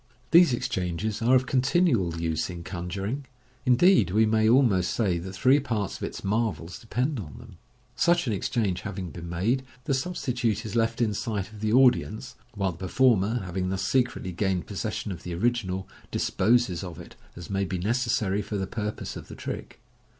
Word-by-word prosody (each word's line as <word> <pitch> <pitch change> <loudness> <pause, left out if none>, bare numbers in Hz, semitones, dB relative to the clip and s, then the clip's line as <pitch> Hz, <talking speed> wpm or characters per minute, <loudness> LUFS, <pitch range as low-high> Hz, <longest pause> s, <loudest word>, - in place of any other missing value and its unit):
These 170 -2 +7
exchanges 105 -4 -2
are 120 +3 +4
of 130 0 +3
continual 125 - +2
use 80 -1 -1
in 85 -1 -7
conjuring; 95 +10 -4 0.4
indeed, 125 - +5
we 110 +4 +4
may 110 0 +3
almost 110 -9 +3
say 95 -7 +1
that 95 +2 -7
three 130 +9 +4
parts 110 -8 -2
of - - -19
its - - -5
marvels 100 -3 -1
depend 125 +4 -1
on 75 -8 -8
them. 115 -8 -13 0.4
Such 175 +7 +3
an 115 - 0
exchange 100 -3 -1
having 95 -5 -5
been 85 -1 -8
made, 110 +10 0 0.2
the 140 - 0
substitute 125 - -1
is 110 - -5
left 115 0 +1
in 110 -3 +2
sight 105 -1 -3
of 105 - -11
the 105 0 0
audience, 125 -1 +3 0.2
while 100 -2 0
the 80 - -13
per 95 - -4
former, 115 -1 +3
having 90 +1 -2
thus 95 0 -2
secretly 120 -7 0
gained 95 -1 -1
possession 105 +1 -4
of 85 -3 -6
the 90 -1 -5
original, 95 -2 -1 0.2
disposes 105 -4 +1
of 85 -3 -7
it - - -11 0.2
as 90 +2 -9
may 100 0 +1
be 95 -1 -2
necessary 105 -1 0
for 105 - -4
the 95 - -1
purpose 105 +2 -4
of - - -8
the - - -9
trick. - - -7
105 Hz, 185 wpm, -27 LUFS, 95-120 Hz, 0.4 s, These